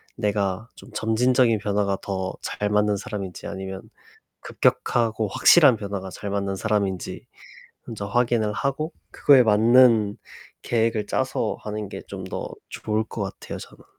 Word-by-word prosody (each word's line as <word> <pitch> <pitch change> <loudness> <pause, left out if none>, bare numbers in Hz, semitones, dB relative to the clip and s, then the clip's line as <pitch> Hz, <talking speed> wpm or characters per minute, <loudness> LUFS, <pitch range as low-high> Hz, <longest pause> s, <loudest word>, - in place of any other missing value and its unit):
내가 105 +1 -1
좀 - - -14
점진적인 115 0 +2
변화가 100 -2 0
더 95 -1 -3
잘 105 0 -3
맞는 105 0 +2
사람인지, 100 -5 -6
아니면 95 0 -6 0.6
급격하고 115 -2 +1
확실한 140 - +6
변화가 100 -2 -5
잘 100 - -6
맞는 100 -1 -2
사람인지 100 -3 -2 0.6
먼저 100 -3 -5
확인을 115 -1 +1
하고 140 +7 -2 0.2
그거에 135 -3 +6
맞는 110 -1 +5 0.5
계획을 115 -2 0
짜서 - - -1
하는 105 -1 -5
게 - - -7
좀 95 -2 -7
더 95 - -5 0.2
좋을 110 0 -2
것 110 - -6
같아요, 95 - -6
저는. - - -13
105 Hz, 290 characters per minute, -24 LUFS, 100-115 Hz, 0.6 s, 확실한